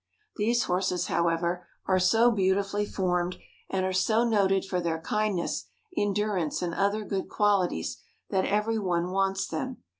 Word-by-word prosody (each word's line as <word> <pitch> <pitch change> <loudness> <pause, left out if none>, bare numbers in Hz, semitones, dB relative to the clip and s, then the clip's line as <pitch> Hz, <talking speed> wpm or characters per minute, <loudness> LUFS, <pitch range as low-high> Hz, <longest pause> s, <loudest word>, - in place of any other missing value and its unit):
These 235 +3 +2
horses, 180 -1 0
however, 170 +1 0 0.2
are 185 -1 +3
so 225 +6 +4
beautifully 200 0 +1
formed, 180 -2 -1 0.3
and 190 -1 0
are 185 - -1
so 215 +5 +3
noted 195 -4 +2
for 180 -2 -1
their 165 -1 -1
kindness, 210 0 -1 0.3
endurance, 205 -6 0
and 170 -1 -2
other 200 +3 0
good 195 -2 -3
qualities, 195 - +1 0.3
that 190 -1 +2
every 210 +2 +1
one 180 -2 0
wants 195 0 +1
them. 260 +4 -5
190 Hz, 145 wpm, -28 LUFS, 180-210 Hz, 0.3 s, so